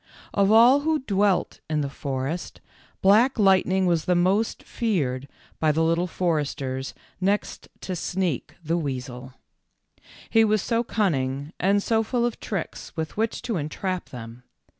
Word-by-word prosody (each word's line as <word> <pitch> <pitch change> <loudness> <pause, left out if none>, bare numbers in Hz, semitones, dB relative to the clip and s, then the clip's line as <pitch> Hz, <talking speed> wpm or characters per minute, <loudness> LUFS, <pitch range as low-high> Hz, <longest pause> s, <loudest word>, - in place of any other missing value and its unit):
Of 200 0 +3
all 240 +5 +7
who 310 -1 0
dwelt 200 -3 +1
in 155 -1 0
the 140 - -1
forest, 140 +4 -4 0.4
Black 220 +8 +5
Light 195 -3 +4
ning 190 0 +2
was 170 -3 +1
most 185 +5 +2
feared 140 - -1 0.3
by 155 -1 +3
the 160 +2 +1
Little 165 +2 +1
Foresters 145 -7 -2 0.2
next 200 +2 -1
to 185 - -4
Sneak, 175 -4 -2
the 165 +2 0
weasel. 130 -3 -5 0.9
He 225 -1 +4
was 215 -2 +2
so 235 0 +1
cun 215 -5 +1
ning 135 +2 -3
and 200 +2 +2
so 225 -1 +2
full 235 +2 0
of 240 - -3
tricks 190 -3 -5
with 160 -1 -3
which 225 +1 -1
to 230 -6 -2
entrap 180 +4 -3
them. 115 -1 -9
180 Hz, 150 wpm, -25 LUFS, 145-210 Hz, 0.9 s, all